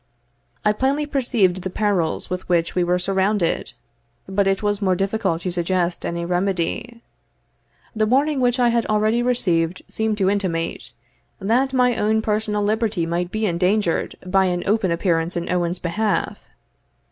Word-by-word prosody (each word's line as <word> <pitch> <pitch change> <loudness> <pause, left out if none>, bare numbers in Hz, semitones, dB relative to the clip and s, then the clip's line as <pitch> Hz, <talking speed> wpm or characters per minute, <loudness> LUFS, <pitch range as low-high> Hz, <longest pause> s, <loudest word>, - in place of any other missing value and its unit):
I 210 - +4
plainly 270 +6 0
perceived 235 -10 +1
the 185 - -4
perils 185 -4 0
with 180 0 -5
which 170 -2 +1
we 180 - +1
were 175 +1 +2
surrounded, 190 0 0 0.5
but 195 +1 +1
it 195 +2 0
was 205 0 0
more 185 -2 +2
difficult 195 -3 -1
to 180 - -2
suggest 175 0 -1
any 170 0 -3
remedy. 195 +6 -2 0.9
The 215 0 +1
warning 280 +4 +2
which 245 0 +2
I 240 -1 +4
had 235 -1 +1
already 215 +2 +2
received 180 -9 0
seemed 220 -1 -1
to 195 -2 +1
intimate, 165 - -2 0.5
that 240 +7 +1
my 250 -2 +3
own 220 +1 +1
personal 210 -1 0
liberty 215 -4 0
might 175 +1 -2
be 215 +3 -1
endangered 180 0 0
by 190 +1 +3
an 175 -1 -1
open 205 -2 +1
appearance 170 0 0
in 170 - -3
Owen's 175 0 0
behalf. 205 +6 -1
195 Hz, 155 wpm, -21 LUFS, 175-220 Hz, 0.9 s, I